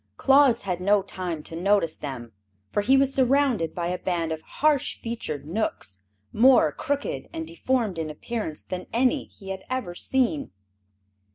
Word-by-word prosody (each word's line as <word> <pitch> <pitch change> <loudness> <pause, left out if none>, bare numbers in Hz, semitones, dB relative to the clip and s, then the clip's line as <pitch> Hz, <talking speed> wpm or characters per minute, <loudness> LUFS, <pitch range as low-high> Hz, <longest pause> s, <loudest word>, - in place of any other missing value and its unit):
Claus 270 -3 +5
had 180 -3 -2
no 200 +1 +3
time 180 -5 -4
to 165 - -7
notice 180 -2 +2
them, 125 -5 -7 0.4
for 205 - +1
he 260 +6 +4
was 270 0 +3
surrounded 260 - +2
by 175 - -2
a 180 - -2
band 170 -3 -1
of 160 0 -3
harsh 295 - +1
featured 190 - -5
Knooks, 155 - -3 0.3
more 245 - +6
crooked 285 - -3
and 325 -1 -5
deformed 255 - -1
in 160 -1 -3
appearance 160 +1 -5
than 185 0 -6
any 255 +4 +2
he 195 -2 -13
had 190 0 -4
ever 255 -9 -3
seen. 235 - 0
200 Hz, 160 wpm, -25 LUFS, 165-260 Hz, 0.4 s, more